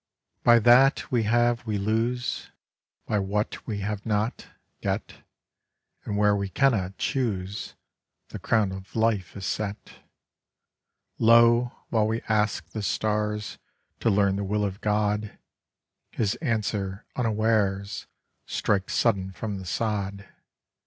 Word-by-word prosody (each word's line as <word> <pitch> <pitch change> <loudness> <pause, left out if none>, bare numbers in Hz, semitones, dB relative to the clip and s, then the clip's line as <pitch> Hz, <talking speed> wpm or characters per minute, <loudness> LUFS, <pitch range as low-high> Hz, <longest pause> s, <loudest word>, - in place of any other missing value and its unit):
By 120 0 +7
that 125 +6 +5
we 120 -3 +2
have 120 +1 +2
we 105 -1 0
lose; 115 +5 -1 0.6
By 105 - 0
what 100 +2 -2
we 105 -2 -3
have 105 0 -3
not, 110 +1 -1 0.3
get; - - -3 0.9
And 100 - -2
where 105 0 +4
we 100 -1 -2
cannot 100 -6 +1
choose 105 -7 -2 0.5
The - - -7
crown 110 -4 +1
of 95 0 -9
life 110 -5 0
is 95 - -6
set. 100 +1 -4 1.2
Lo, 115 +1 +5 0.2
while 110 -2 +2
we 115 +1 -1
ask 105 -1 0
the 110 - -5
stars 105 0 -1 0.4
To - - +2
learn 100 -1 +3
the 100 - -2
will 105 +1 0
of 100 +1 -5
God, 105 0 0 0.7
His 110 -1 0
answer 105 - -2
unawares 110 -4 0 0.4
Strikes 100 -2 0
sudden 95 -5 +1
from 100 0 -5
the 95 - -9
sod. 100 0 -2
105 Hz, 125 wpm, -26 LUFS, 100-115 Hz, 1.2 s, By